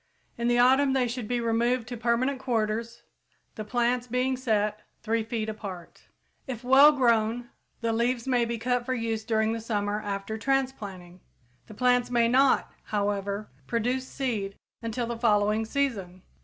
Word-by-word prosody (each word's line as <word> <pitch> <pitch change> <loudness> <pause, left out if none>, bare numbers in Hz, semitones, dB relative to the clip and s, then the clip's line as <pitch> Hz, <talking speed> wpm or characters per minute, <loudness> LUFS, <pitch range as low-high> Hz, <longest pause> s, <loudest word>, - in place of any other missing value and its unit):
In 235 0 -2
the 240 0 +3
autumn 265 +3 +5
they 260 -2 +2
should 240 -2 -4
be 245 +1 0
removed 235 +1 +1
to 245 - -4
permanent 240 +4 0
quarters, 230 -2 -2 0.5
the 215 - -6
plants 245 +2 0
being 250 +2 0
set 215 -4 0 0.2
3 230 0 +1
feet 220 0 -3
apart. 195 -5 -8 0.4
If 250 -2 -5
well 270 +4 +8
grown, 240 -3 +1 0.3
the 230 -1 0
leaves 235 +2 0
may 250 -2 +3
be 235 0 -2
cut 245 +1 0
for 255 +1 -2
use 225 -2 -2
during 220 -1 +1
the 230 0 -3
summer 210 -2 -1
after 205 +1 -4
transplanting; 210 -9 -2 0.5
the 215 - -11
plants 245 +1 +2
may 235 -1 +3
not, 265 +3 +3
however, 205 -1 -2 0.2
produce 250 +3 -1
seed 220 -9 -3 0.3
until 230 +1 -2
the 235 0 -4
following 210 -1 +2
season. 215 -9 -2
230 Hz, 155 wpm, -27 LUFS, 215-250 Hz, 0.5 s, well